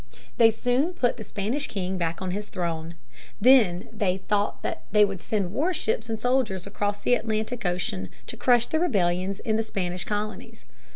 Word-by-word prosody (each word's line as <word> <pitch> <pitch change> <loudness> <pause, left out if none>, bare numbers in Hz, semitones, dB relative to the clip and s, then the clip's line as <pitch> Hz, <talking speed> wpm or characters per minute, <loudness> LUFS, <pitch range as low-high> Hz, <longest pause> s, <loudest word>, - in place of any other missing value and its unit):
They 225 -1 +7
soon 245 +9 +1
put 245 -8 +1
the 220 - -6
Spanish 225 +9 -2
king 190 -1 -3
back 170 +2 -2
on 185 - -2
his 205 +3 -4
throne. 170 -2 -3 0.4
They 255 +4 +8 0.3
then 200 -4 0
thought 205 -1 0
that - - -3
they 210 0 +6
would 195 -3 -5
send 200 -5 -1
warships 275 -7 0
and 220 -1 -2
soldiers 245 -7 0
across 205 +1 -2
the 245 - +2
Atlantic 225 -1 -1
Ocean 135 - -2 0.2
to - - -5
crush 240 -2 +4
the 315 - 0
rebellions 190 - +1
in 220 -1 0
the 225 - +1
Spanish 180 -4 -3
colonies. 210 +1 -5
210 Hz, 175 wpm, -26 LUFS, 185-240 Hz, 0.4 s, They